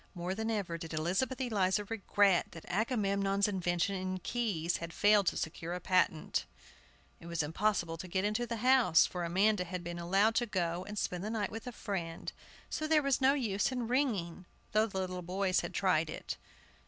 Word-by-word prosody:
More 175 +1 -3
than 220 +3 -3
ever 195 -7 -2
did 165 -1 -6
Elizabeth 190 +12 0
Eliza 205 -5 +1
regret 200 -3 +2
that 165 - -10
Agamemnon's 200 -2 +1
invention 180 -1 0
in 185 0 -3
keys 185 -6 -1
had 170 -1 -7
failed 205 -2 +4
to - - +1
secure 165 +1 -4
a - - -4
patent! 185 -3 +1 0.7
It 170 - -11
was 170 -2 -1
impossible 170 +1 0
to 185 - -7
get 190 +2 0
into 215 +3 0
the 235 - -2
house, 255 -10 +6
for 180 -1 -4
Amanda 190 +3 +2
had 180 0 -5
been 175 0 -5
allowed 195 +6 +3
to 240 - +1
go 175 -3 -1
and 210 0 -6
spend 180 -2 -2
the 210 - -3
night 220 -2 -2
with 225 +2 -7
a - - -3
friend, 175 -7 -4 0.3
so 310 - -3
there 310 -1 +4
was 275 -1 +1
no 270 +2 +5
use 220 -5 0
in 250 -3 -2
ringing, 205 -10 -1 0.2
though 215 +1 +3
the 195 - -6
little 185 -1 -3
boys 185 +1 0
had - - -4
tried 165 -5 +2
it. - - -5
195 Hz, 190 wpm, -32 LUFS, 175-220 Hz, 0.7 s, house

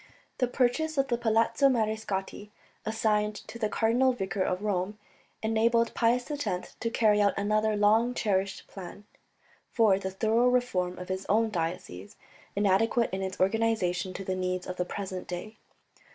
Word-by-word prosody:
The 250 - +2
purchase 270 +5 0
of 275 0 +1
the 240 - +1
Palazzo 230 +3 +3
Mariscotti, 215 -4 -2 0.4
assigned 210 -1 +1
to 235 - -9
the 215 -2 0
Cardinal 240 +4 +2
Vicar 195 -4 -3
of 185 +1 -1
Rome, 205 0 -1 0.5
enabled 230 +1 +2
Pius 245 +4 +1
X 280 -11 -3
to 230 - -1
carry 215 -3 +3
out 200 -1 +2
another 215 +1 +1
long 220 +4 +3
cherished 195 -2 -1
plan, 195 +2 -10 0.6
for 215 -5 +3
the 190 - -3
thorough 225 +5 +2
reform 190 -8 +1
of 180 0 -8
his 190 +1 -3
own 220 +2 +3
diocese, 165 - -4 0.4
inadequate 210 +4 +2
in 190 - -2
its 190 -1 -4
organization 190 -3 +1
to 195 - -6
the 185 - -1
needs 185 0 -2
of 180 0 -6
the 180 - 0
present 185 -1 -5
day. 215 +5 -6
210 Hz, 155 wpm, -28 LUFS, 190-230 Hz, 0.6 s, Palazzo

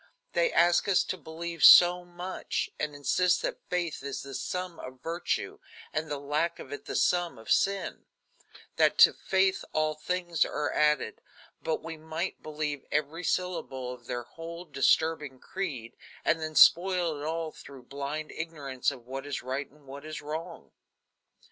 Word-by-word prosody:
They - - +2
ask 175 +2 +4
us 195 -2 +4
to - - -3
believe 165 -2 -6
so 180 0 +9
much, 175 +1 -4
and 150 -1 -2
insist 180 +6 +2
that - - -3
faith 175 -5 -1
is 140 0 -5
the 140 0 -9
sum 180 +4 -4
of 130 0 -10
virtue, 170 +2 -2 0.3
and 155 0 -2
the 145 - -2
lack 150 +4 -1
of 140 - -9
it 145 - -7
the - - -5
sum 175 -4 +2
of 110 - -7
sin; 195 0 +1 0.7
that - - +4
to - - +8
faith 190 0 +1
all 155 0 +1
things 175 +1 0
are 150 -2 -2
added; 150 -7 +1 0.4
but 160 - -2
we 165 0 -6
might 160 +3 -4
believe 150 -2 -3
every 150 +3 -1
syllable 135 -9 -2
of 120 -1 -14
their 120 0 -3
whole 165 +7 -9
disturbing 150 0 +1
creed, 135 -13 -5 0.3
and 165 0 +2
then 155 0 -4
spoil 175 -4 +5
it - - -5
all 160 +1 -2
through 135 -4 -13
blind 140 +4 -5
ignorance 145 -6 -2
of 120 -2 -9
what 135 +2 -6
is 145 - -4
right 130 +3 -3
and 150 0 -23
what 140 +1 -9
is 155 0 -6
wrong." 160 +3 -6
155 Hz, 165 wpm, -29 LUFS, 140-175 Hz, 0.7 s, so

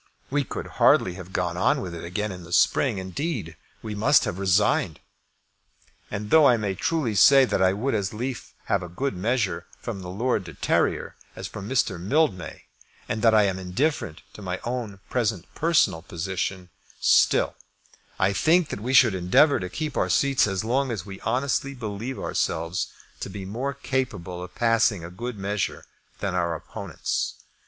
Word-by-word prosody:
We 145 0 +2
could - - -6 0.2
hardly 90 - +5
have 90 0 -10
gone 90 -2 -1
on 140 +10 +2
with 90 -9 -5
it 85 - -7
again 105 +5 -3
in 90 -1 -8
the 85 - -12
spring. 110 +6 +3
Indeed, 95 - -4 0.3
we 110 -1 -4
must 110 +7 +4
have 85 - -3
resigned. 95 -3 +2 1.1
And 105 +1 -5
though 155 -3 +7
I 120 - +5
may 105 -3 -1
truly 135 - -1
say 135 +7 +7
that 105 - -1
I 95 0 +4
would 120 +8 -1
as 100 -4 -1
lief 110 -3 -5
have 100 - +1
a 90 - -7
good 130 +8 -2
measure 100 -3 -1
from 110 -5 -6
Lord 95 +6 -1
de 80 -4 -10
Terrier - - 0 0.2
as - - -5
from 105 0 -8
Mr. 130 -9 +1
Mildmay, 100 - 0 0.4
and 110 - -2
that 115 -2 +5
I 105 - +6
am 95 -2 0
indifferent 95 - -2
to - - -11
my 90 -1 -3
own 120 -5 -4
present 110 -8 0
personal 160 - +2
position, 90 +1 -4 0.3
still - - +4 0.6
I 95 +1 +2
think 165 - +3
that - - -4
we 125 +4 -2
should 120 -5 +7
endeavour 95 - +4
to 90 - -4
keep 155 - -4
our - - +1
seats 135 -5 +3
as 95 0 -2
long 130 +4 +1
as 105 -7 -4
we 95 -1 -9
honestly 135 +1 -1
believe 115 +2 -5
ourselves 80 +2 -1 0.3
to - - -5
be 95 0 -7
more 125 +8 -3
capable 110 -11 -3
of 90 0 -9
passing 115 -6 +2
a 85 - -8
good 120 +5 -5
measure 100 0 -2 0.4
than 100 -2 -1
are 90 -1 0
our 85 - -2
opponents. 95 +1 -4
100 Hz, 180 wpm, -25 LUFS, 90-125 Hz, 1.1 s, though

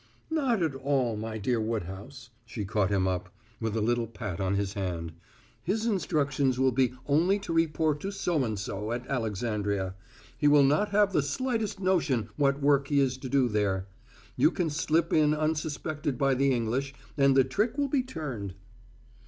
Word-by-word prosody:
"Not 260 - +1
at 160 -4 0
all, 135 -3 0
my 110 +1 -4
dear 115 +2 0
Woodhouse," 110 +4 -5
she 110 -2 -5
caught 100 -1 +1
him 95 -2 +1
up, 90 0 -2 0.3
with 110 -1 -2
a - - 0
little 120 +1 +1
pat 105 -5 -6
on 95 +1 0
his 100 0 -1
hand. 85 -5 -3 0.5
"His 215 +6 -1
instructions 140 - +1
will 130 0 +4
be 125 0 +2
only 165 +7 +3
to 200 -4 -5
report 160 -2 +1
to 195 - -4
So 175 -7 0
and 110 -4 -2
so 105 +3 -4
at 120 +1 -4
Alexandria; 105 -6 -2 0.5
he 145 - +3
will 145 -1 +6
not 150 +10 +3
have 205 -1 +3
the 150 - +3
slightest 215 - -2
notion 160 - +1
what 140 +1 +1
work 140 -1 +3
he 145 -1 +2
is 135 -2 +2
to 130 - -7
do 135 -2 +3
there. 100 -4 0 0.5
You - - +5
can 170 -2 -1
slip 160 +2 +1
in 150 -1 +4
unsuspected 155 -2 -2
by 135 -1 +2
the 135 +1 +2
English, 130 +3 -1 0.2
and 140 -2 +4
the 135 - +7
trick 210 - -1
will 285 -1 +1
be 275 -1 +1
turned." 135 - -6
135 Hz, 180 wpm, -28 LUFS, 110-155 Hz, 0.5 s, the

